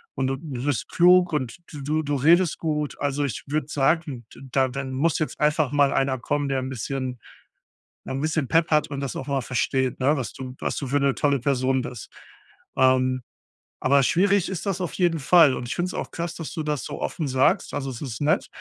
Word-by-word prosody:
Und 130 0 0
du 135 0 -1
du 130 -5 -6
bist 145 -5 -1
klug 180 0 +5
und 130 -6 -2 0.2
d 150 - -7
du 155 +3 0
du 145 -1 -2
redest 165 +5 +4
gut. 150 -2 -2
Also, 145 0 0
ich 125 -8 -4
würde 150 0 -1
sagen, 140 -4 0
d - - -14
da 135 -1 +3
dann 135 0 -5
muss 150 +5 +1
jetzt 155 - -3
einfach 150 -2 +2
mal 145 -1 +4
einer 135 -1 +1
kommen, 145 +3 -1
der 135 -1 0
'n 130 - -4
bisschen 130 0 -4 0.9
ja, - - -5
'n 135 - -3
bisschen 155 -2 -1
Pepp 165 0 +2
hat 155 -1 +3
und 140 -2 -4
das 140 -3 -4
auch 135 - -5
mal 140 -1 0
versteht, 130 +1 -1
ne, 140 +4 +3
was 130 -4 -4
du 130 -1 -7
was - - -2
du 140 - -3
für 140 +2 +1
'ne 140 -1 +2
tolle 145 -1 +1
Person 130 0 +1
bist. 125 -3 -8 0.7
Ähm, 130 0 +3 0.6
aber 140 +1 +4
schwierig 195 +6 +2
ist 190 0 -4
das 195 -2 -2
auf 175 - -2
jeden 175 -3 +1
Fall 155 -1 +6
und 120 - -5
ich - - -2
finde 175 +1 -1
es 185 - -6
auch - - -5
krass, 170 0 -4
dass 165 - -6
du 160 - -3
das 150 -2 -2
so 145 - -6
offen 155 - -2
sagst. 130 0 +2
Also, 135 -1 -3
es 120 - -8
ist 125 -6 -5
nett. 150 +1 +1
140 Hz, 230 wpm, -24 LUFS, 130-155 Hz, 0.9 s, Fall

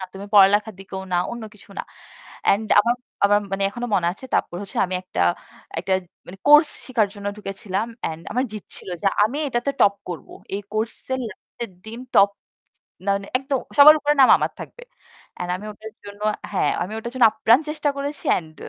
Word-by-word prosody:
না 185 - -4
তুমি 200 +1 -7
পড়ালেখার 205 +2 +5
দিকেও 190 0 -7
না, - - +3 0.2
অন্য 235 -1 -6
কিছু 205 - -19
না।" - - -2 0.6
অ্যান্ড 210 +2 +3
আমার 235 +3 +1 0.3
আমার 205 +1 +5
মানে 195 0 -1
এখনো 240 +3 -5
মনে 175 -3 +2
আছে 200 - -13
তারপর 175 - 0
হচ্ছে 200 - -6
আমি 185 - -4
একটা 180 - -5 0.6
একটা 190 - -2 0.3
মানে 190 +2 -11
কোর্স 295 +1 +8 0.2
শিখার 230 -5 +1
জন্য 205 -1 -8
ঢুকেছিলাম। 195 +1 -3 0.2
অ্যান্ড 160 0 -4
আমার 250 +3 +1
জিদ্‌ 215 -2 -7
ছিল, - - -11
যে 200 - 0 0.2
আমি 230 +7 -2
এটাতে 240 +2 -1
টপ 200 - +5
করব। 175 -2 -6 0.3
এই 200 - -2
কোর্সের 225 +4 -3
লাস্টের 230 +3 -9 0.2
দিন 230 +2 -7
টপ, 200 0 +6 0.8
মা - - +2
মানে 200 0 -7
একদম 270 0 -1 0.2
সবার 300 +2 +11
উপরে 295 0 +2
নাম 260 - +8
আমার - - -1
থাকবে। 485 - -10 0.5
অ্যান্ড 180 0 -4
আমি 200 - -10
ওটার 215 +1 -11
জন্য 205 +1 -10 0.3
হ্যাঁ, 195 - +1
আমি 190 - -5
ওটার 235 +2 -6
জন্য 250 -3 +6
আপ্রাণ 225 +4 +4
চেষ্টা 305 -1 -1
করেছি। 285 +1 -5
অ্যান্ড 160 -3 -2
210 Hz, 190 wpm, -22 LUFS, 195-245 Hz, 0.8 s, সবার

